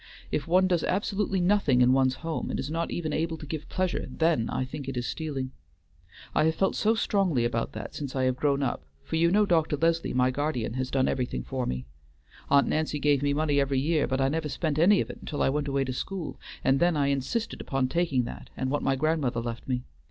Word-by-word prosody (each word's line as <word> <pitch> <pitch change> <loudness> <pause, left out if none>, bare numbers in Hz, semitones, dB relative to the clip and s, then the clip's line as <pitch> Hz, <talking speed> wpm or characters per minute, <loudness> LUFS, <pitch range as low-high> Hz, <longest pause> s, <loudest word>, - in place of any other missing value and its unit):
If 145 - -1
one 185 +3 +4
does 175 -3 +1
absolutely 195 0 0
nothing 175 -9 +3
in 125 +1 +5
one's 130 -1 +3
home, 165 -1 -2
and - - -2
is 135 +3 -3
not 165 +1 -1
even 155 -3 -3
able 165 +1 -1
to 155 - -9
give 150 0 -6
pleasure, 185 -1 -1
then 160 -8 +1
I 130 - -1
think 135 0 -6
it 130 - -4
is 120 - -1
stealing. 135 -5 -3 0.8
I - - +3
have 160 0 +2
felt 195 +3 +1
so 220 +2 +2
strongly 185 - +1
about 120 -1 -1
that - - -6
since 140 -3 -5
I 130 - +1
have 130 -1 +2
grown 140 +1 +1
up, 135 - -2 0.2
for - - -4
you 165 +1 +4
know 210 +3 +4
Dr. 160 -5 +2
Leslie, 165 -1 +1
my 125 0 +3
guardian, 130 -5 -2
has 130 0 -2
done 130 -1 +1
everything 125 - -1
for 65 - -3
me. 65 0 -3 0.6
Aunt 140 0 +5
Nancy 155 -1 0
gave 145 -1 +2
me 145 0 +1
money 145 0 +2
every 135 -1 +1
year, 155 +2 +1
but 130 +2 -1
I 135 - +3
never 155 +2 -1
spent 155 -1 -1
any 190 +4 +5
of - - -4
it - - -12
until 145 - -2
I - - +3
went 145 +1 -1
away 140 -1 +1
to 130 -1 -3
school, 180 +5 -5 0.2
and 135 +1 +3
then 175 -2 +3
I 140 -1 +2
insisted 140 - -2
upon 135 -1 0
taking 145 -4 +1
that 120 - -8
and 130 0 -1
what 145 - 0
my 135 - +1
grandmother 140 -4 0
left 115 0 -5
me. 125 -2 -1
145 Hz, 235 wpm, -27 LUFS, 130-165 Hz, 0.8 s, in